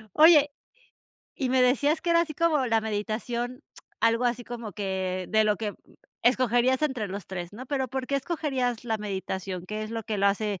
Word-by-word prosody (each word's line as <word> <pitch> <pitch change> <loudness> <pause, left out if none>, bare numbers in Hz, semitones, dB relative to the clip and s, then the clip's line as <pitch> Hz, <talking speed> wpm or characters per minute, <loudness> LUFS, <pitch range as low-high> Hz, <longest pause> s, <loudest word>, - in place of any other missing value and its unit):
Oye, 300 -2 +7 0.8
y 265 -3 -2
me 255 0 +4
decías 285 +5 +3
que 345 - -1
era 335 0 +5
así 310 -3 -6
como 305 -5 +2
la 225 -1 +2
meditación, 230 +3 -3 0.4
algo 230 +2 +3
así 245 0 0
como 235 -3 -7
que, 185 -1 -2
de 220 0 +3
lo 210 -1 +2
que 210 -2 -4 0.5
escogerías 255 +2 +3
entre 255 -8 -1
los 195 0 -6
3, 175 -1 -6
¿no?, 250 +4 -9
pero, 265 -2 -1
¿por 260 0 -3
qué 280 - 0
escogerías 265 -6 -2
la 225 -2 0
meditación?, 190 -2 -4
¿qué 215 +2 -4
es 215 - -6
lo 225 -1 -3
que 210 -1 -3
lo 200 - +3
hace 200 -1 0
235 Hz, 190 wpm, -27 LUFS, 210-265 Hz, 0.8 s, Oye